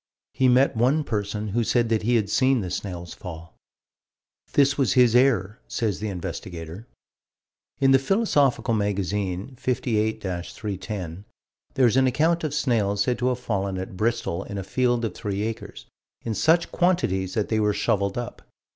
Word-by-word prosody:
He 130 0 +2
met 130 +2 +4
one 130 +7 +2
person 105 -3 -3
who 115 +4 0
said 120 0 +1
that 110 -1 +1
he 120 +3 +1
had 110 -3 +2
seen 130 +3 +2
the 90 -2 -5
snails 90 -3 -5
fall. 85 -4 -10 1.0
"This 140 0 +4
was 135 -3 +2
his 125 -2 +5
error," 120 -4 +3
says 110 -5 -2
the 105 0 -3
investigator. 90 +1 -6 0.9
In 135 -1 +4
the 135 - +6
Philosophical 140 - +2
Magazine, 100 +1 -2
58 110 -4 -1
310, 95 0 -5 0.5
there 130 - +4
is 120 +2 +3
an 130 0 +4
account 165 +6 +1
of 150 -2 -2
snails 105 -8 +1
said 125 +3 -1
to 125 - +1
have 125 -1 +1
fallen 100 -5 -2
at 95 0 -6
Bristol 100 -3 -1
in 100 - -6
a 95 - -3
field 120 +3 +1
of 105 - -3
three 100 -1 -3
acres, 110 0 -6 0.4
in 115 - -1
such 165 +9 +2
quantities 95 - +1
that 105 - 0
they 110 - +1
were 105 -1 +2
shoveled 100 0 0
up. 120 0 -5
110 Hz, 165 wpm, -24 LUFS, 100-130 Hz, 1.0 s, the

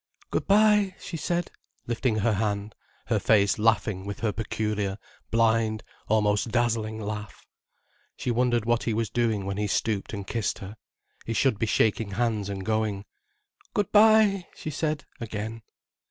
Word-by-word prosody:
"Good - - -1
bye," 210 -1 +4
she 175 - -7
said, 175 +2 -2 0.3
lifting 120 0 0
her 110 +1 +2
hand, 100 0 -1 0.3
her - - +1
face 100 -2 +3
laughing 105 -3 +2
with 100 0 -6
her 110 -2 +1
peculiar, 105 -2 -2 0.3
blind, 110 -1 +2 0.2
almost 105 +1 +2
dazzling 110 -2 0
laugh. 105 -1 -6 0.7
She 125 - -2
wondered 120 -1 +1
what 120 0 +2
he 115 - -1
was 115 -1 -1
doing, 110 -5 0
when 100 0 -3
he 105 0 0
stooped 105 0 -1
and 100 -2 -5
kissed 115 +1 -2
her. 100 +2 -8 0.5
He 115 - -1
should 120 -2 +2
be 115 - 0
shaking 110 -1 +1
hands 110 -2 0
and 95 -1 -5
going. 110 -2 -1 0.7
"Good 205 -2 0
bye," 210 -3 +5
she 155 - -5
said 150 -1 -2
again. 110 0 -5
110 Hz, 155 wpm, -26 LUFS, 105-120 Hz, 0.7 s, bye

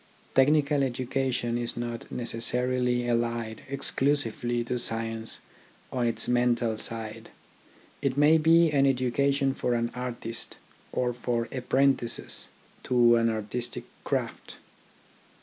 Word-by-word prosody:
Technical 145 +1 +4
education 125 -2 -1
is 120 0 -4
not 120 -1 -5
necessarily 125 +1 0
allied 115 -1 -1
exclusively 130 -4 0
to 125 +1 -2
science 115 -1 -2 0.5
on 125 -2 0
its 115 - +2
mental 120 -2 +2
side. 110 -2 -4 0.7
It 140 -1 0
may 150 +2 +6
be 165 +1 +5
an 140 -1 +4
education 135 +2 +1
for 125 -2 -1
an 120 0 -1
artist 120 -2 -5 0.3
or 125 -1 0
for 120 -1 -2
apprentices 130 -1 0 0.4
to 120 -1 +5
an 115 0 +3
artistic 110 +2 -3 0.2
craft. - - -3
120 Hz, 110 wpm, -27 LUFS, 115-135 Hz, 0.7 s, may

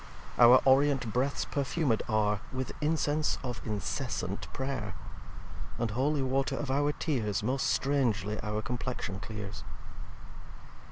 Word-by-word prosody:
Our 125 +1 +8
Orient 135 -4 +4
Breaths 135 +3 0
perfumed 140 -3 0
are 105 -1 +2
With 130 0 -3
insense 150 0 +1
of 120 -3 -4
incessant 100 -2 -3
Pray'r. 130 -7 -3 0.8
And 115 -2 -1
Holy 135 +5 +1
water 135 +1 0
of 140 -3 -2
our 145 +2 +2
Tears 115 -11 -1
Most 130 +3 0
strangly 110 -4 +1
our 105 0 -2
Complexion 120 -4 -3
clears. 105 -2 -7
125 Hz, 115 wpm, -30 LUFS, 105-140 Hz, 0.8 s, Our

